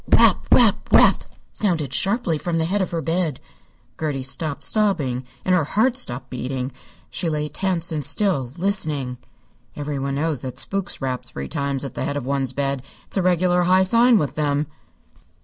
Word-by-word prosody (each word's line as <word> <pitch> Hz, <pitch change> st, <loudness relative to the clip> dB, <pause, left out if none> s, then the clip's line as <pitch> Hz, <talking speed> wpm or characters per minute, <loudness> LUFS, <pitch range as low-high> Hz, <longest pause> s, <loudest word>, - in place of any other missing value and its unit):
"Rap -, -, +5 dB
rap -, -, +4 dB
rap!" -, -, +6 dB, 0.3 s
sounded 165 Hz, -, 0 dB
sharply 195 Hz, -, +2 dB
from 170 Hz, 0 st, -2 dB
the 160 Hz, -, +1 dB
head 195 Hz, +4 st, 0 dB
of 185 Hz, -, -1 dB
her 165 Hz, -2 st, -3 dB
bed. 165 Hz, -4 st, -1 dB, 0.6 s
Gertie 145 Hz, -4 st, -2 dB
stopped 140 Hz, +1 st, -3 dB
sobbing, 145 Hz, -, +1 dB, 0.2 s
and 185 Hz, -, +3 dB
her 180 Hz, -3 st, +3 dB
heart 225 Hz, -, +1 dB
stopped 130 Hz, -, -5 dB
beating. 130 Hz, +1 st, -3 dB, 0.4 s
She 170 Hz, -, -1 dB
lay 150 Hz, -1 st, -1 dB
tense 170 Hz, +1 st, -1 dB
and 155 Hz, -2 st, -2 dB
still, 145 Hz, -, +2 dB
listening. 155 Hz, -, -1 dB, 0.6 s
Everyone 140 Hz, -2 st, -3 dB
knows 150 Hz, -2 st, -1 dB
that 130 Hz, -1 st, -6 dB
spooks 195 Hz, -4 st, -2 dB
rap 130 Hz, -1 st, -2 dB
three 70 Hz, 0 st, -7 dB
times 140 Hz, -, -2 dB
at 135 Hz, -, -6 dB
the -, -, -4 dB
head 145 Hz, -, -2 dB
of 140 Hz, -, -4 dB
one's 135 Hz, -2 st, 0 dB
bed. 140 Hz, 0 st, -2 dB, 0.2 s
It's -, -, -4 dB
a -, -, +3 dB
regular 180 Hz, 0 st, +2 dB
high 185 Hz, +1 st, +5 dB
sign 235 Hz, +4 st, +5 dB
with 150 Hz, -9 st, -1 dB
them. 145 Hz, -1 st, 0 dB
150 Hz, 175 wpm, -22 LUFS, 140-185 Hz, 0.6 s, rap